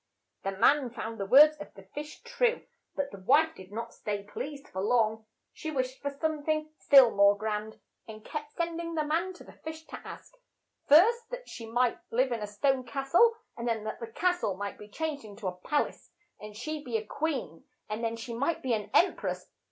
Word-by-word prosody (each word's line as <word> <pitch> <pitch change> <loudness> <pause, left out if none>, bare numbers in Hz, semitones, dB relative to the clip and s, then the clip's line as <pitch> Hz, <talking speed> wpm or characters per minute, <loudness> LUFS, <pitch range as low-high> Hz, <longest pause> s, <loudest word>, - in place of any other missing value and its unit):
The 195 - -2
man 255 +6 +4
found 225 -1 -6
the 195 - -2
words 300 +6 +8
of 300 - -10
the 195 - -12
fish 295 +10 -8
true, 485 0 0 0.3
but 280 -1 -2
the 200 - -9
wife 310 +11 +4
did 190 +1 -13
not 230 +2 -5
stay 205 -1 -4
pleased 280 +7 -7
long. 220 +2 +1 0.3
She 315 - -6
wished 260 -3 -2
for 285 - -1
some 305 +2 -2
thing 310 0 -1
still 270 -5 +7
more 200 0 +5
grand, 215 0 -3 0.3
and 215 -1 -10
kept 295 -1 -6
send 335 0 -2
ing 335 0 -5
the 310 - +1
man 335 +5 0
to 360 - -13
the - - -14
fish 320 0 -8
to - - -8
ask, - - -10 0.5
first 455 +10 +6
that - - -7
she 230 -2 -8
might 240 +1 +1
live 255 +2 +2
in 235 - -1
a 210 - -3
stone 255 +6 +1
cas 270 +3 -5
tle, 460 +6 +6 0.2
and 235 0 -4
then 225 -2 0
that 215 - -5
the 230 - -5
cas 355 +10 +1
tle 195 - -1
might 200 0 -5
be 210 - -11
changed 305 +3 -3
in 210 -2 -11
to 205 -2 -5
a 180 - -3
pal 290 +11 +1
ace - - -13 0.3
and 210 0 -10
she 305 +5 -4
be 240 -5 -1
a 215 - -6
queen, 260 - -3 0.2
and 215 +2 -4
then 230 0 0
that 230 - -9
she 235 0 -6
might 305 +7 -1
be 255 -2 +1
an 210 -2 -2
em 370 - +5
press. - - -5
255 Hz, 225 wpm, -29 LUFS, 215-310 Hz, 0.5 s, words